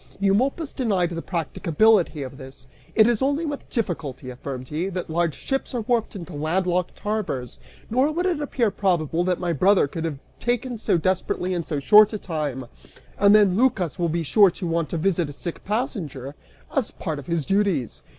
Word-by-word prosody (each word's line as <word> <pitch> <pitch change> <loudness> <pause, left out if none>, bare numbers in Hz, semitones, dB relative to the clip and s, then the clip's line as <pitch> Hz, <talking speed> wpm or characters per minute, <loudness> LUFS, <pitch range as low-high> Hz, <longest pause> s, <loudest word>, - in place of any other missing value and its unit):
Eumolpus 255 - +1
denied 195 -9 0
the 165 -1 -4
practicability 170 0 +1
of 135 +1 -9
this. 130 -1 -11 0.3
"It 220 - +7
is 235 -2 +2
only 285 +5 +1
with 290 -2 -5
difficulty," 155 - -3
affirmed 130 0 -7
he, 165 +5 -2
"that 180 -3 -5
large 170 -1 0
ships 270 -1 -3
are 240 - 0
warped 230 0 0
into 175 -2 -8
landlocked 175 +4 -1
harbors, 205 - -3 0.3
nor 260 +6 +2
would 345 +4 -1
it 345 -5 0
appear 245 -6 0
probable 175 -4 0
that 180 -1 0
my 175 -2 -1
brother 185 +2 +4
could 160 +3 -5
have 160 -3 -2
been - - -30
taken 245 0 -1
so 195 - +2
desperately 185 +1 -1
in 175 -1 -1
so 150 -2 -3
short 210 +8 +7
a - - -1
time. 150 -9 -4 0.5
And 200 +1 +6
then, 205 -4 +5
Lycas 195 - +1
will 170 -1 +1
be 165 +1 -1
sure 195 +7 +5
to 180 +1 -6
want 165 -1 -1
to 170 - -2
visit 170 -2 0
a - - -7
sick 170 +4 -6
passenger, 180 - -3 0.4
as 265 -5 +1
part 155 -4 -5
of 135 - -11
his 165 -4 -1
duties! 195 - 0
180 Hz, 190 wpm, -24 LUFS, 155-215 Hz, 0.5 s, It